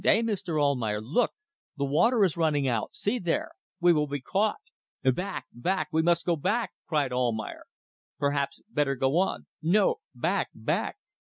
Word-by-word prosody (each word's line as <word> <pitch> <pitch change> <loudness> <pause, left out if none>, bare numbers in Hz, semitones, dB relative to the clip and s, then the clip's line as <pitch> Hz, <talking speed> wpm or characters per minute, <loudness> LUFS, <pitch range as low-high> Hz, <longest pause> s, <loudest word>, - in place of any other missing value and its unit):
"Eh, 225 +3 +4
Mr. 195 -8 -1
Almayer! 125 -8 +1
Look! 150 - +1 0.5
The 140 - 0
water 215 - +3
is 185 -5 +2
running 155 -5 +2
out. 115 -4 -1
See 245 +5 0
there! 175 -5 -1 0.3
We 175 -1 +5
will 150 -2 +1
be 145 0 -3
caught." 200 +11 +1 0.5
"Back! 140 +9 0
back! 155 +6 -1
We 160 - +3
must 170 0 +2
go 175 - +2
back!" 205 +10 0 0.2
cried 145 -5 +1
Almayer. 120 -4 -1 0.5
"Perhaps 140 -1 -1
better 145 -9 0
go 135 +5 +2
on." 190 - 0 0.2
"No; 190 +5 +3 0.2
back! - - 0
back!" - - -1
155 Hz, 160 wpm, -28 LUFS, 135-190 Hz, 0.5 s, We